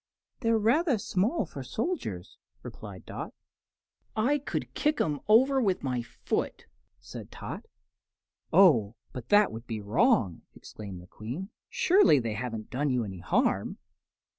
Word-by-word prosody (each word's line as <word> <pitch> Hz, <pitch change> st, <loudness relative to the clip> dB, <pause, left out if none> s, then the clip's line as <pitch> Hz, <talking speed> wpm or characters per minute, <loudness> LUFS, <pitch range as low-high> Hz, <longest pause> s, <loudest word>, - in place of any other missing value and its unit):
"They're 230 Hz, -2 st, +2 dB
rather 250 Hz, -, +3 dB
small 205 Hz, -, 0 dB
for -, -, -8 dB
soldiers," 105 Hz, -, -4 dB, 0.2 s
replied -, -, -9 dB
Dot. -, -, -7 dB, 0.8 s
"I 255 Hz, +7 st, +2 dB
could 280 Hz, -, -4 dB
kick 300 Hz, 0 st, +1 dB
'em 150 Hz, -2 st, 0 dB
all 220 Hz, +3 st, +8 dB
over 270 Hz, 0 st, 0 dB
with 195 Hz, -6 st, 0 dB
my 125 Hz, -3 st, -1 dB
foot!" 115 Hz, -, -3 dB, 0.3 s
said -, -, -9 dB
Tot. -, -, -7 dB, 0.8 s
"Oh, 135 Hz, -, +5 dB, 0.2 s
but 125 Hz, -2 st, -8 dB
that 205 Hz, 0 st, +5 dB
would 115 Hz, +2 st, -8 dB
be 110 Hz, -2 st, -3 dB
wrong," 110 Hz, -, +2 dB
exclaimed 95 Hz, -4 st, -9 dB
the -, -, -14 dB
Queen. 125 Hz, -, -7 dB, 0.2 s
"Surely 365 Hz, -, +5 dB
they 115 Hz, -4 st, -1 dB
haven't 115 Hz, -1 st, -5 dB
done 145 Hz, +3 st, 0 dB
you 125 Hz, -2 st, +1 dB
any 95 Hz, -3 st, -7 dB
harm." 85 Hz, -, 0 dB
150 Hz, 140 wpm, -29 LUFS, -, 0.8 s, all